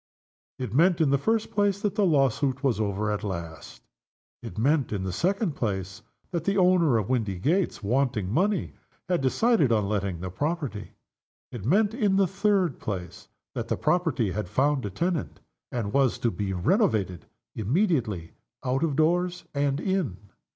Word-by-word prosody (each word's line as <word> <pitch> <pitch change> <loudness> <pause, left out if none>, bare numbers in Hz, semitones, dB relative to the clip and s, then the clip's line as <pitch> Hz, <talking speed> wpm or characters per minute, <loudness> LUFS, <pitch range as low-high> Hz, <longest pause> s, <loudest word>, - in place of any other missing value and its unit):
It 125 -5 -5
meant, 170 +5 +4
in 155 -4 +3
the 140 - +3
first 220 +7 0
place, 205 -1 +1
that 205 -2 0
the 205 -2 +2
lawsuit 135 -2 +1
was 125 -6 +1
over 105 0 -1
at 105 - -3
last. 85 - -6 0.6
It - - -9
meant, 140 +5 +2
in 100 -3 -2
the 95 - -2
second 195 - 0
place 95 -7 -3 0.3
that 170 -3 -2
the 200 +2 0
owner 180 -8 +4
of 105 -3 -1
Windygates, 125 - 0
wanting 115 -3 0
money, 195 - +1 0.3
had 180 -4 +1
decided 155 - +3
on 105 -3 +2
letting 100 -4 -2
the 90 +1 -5
property. 145 - -3 0.6
It 115 -6 -7
meant, 205 +7 +3
in 210 -5 +1
the 195 0 +4
third 195 - +1
place, 90 -4 -6 0.3
that - - -4
the - - -1
property 160 - +1
had 100 -1 -4
found 130 +2 +1
a - - -4
tenant, 170 - -2 0.3
and 110 -5 -3
was 135 -3 +3
to 120 - 0
be 100 -2 -3
renovated 105 - +1 0.3
immediately 115 - 0 0.3
out 130 +2 0
of 155 -4 0
doors 175 +3 +1
and 140 0 0
in. 185 - -1
135 Hz, 165 wpm, -26 LUFS, -, 0.6 s, meant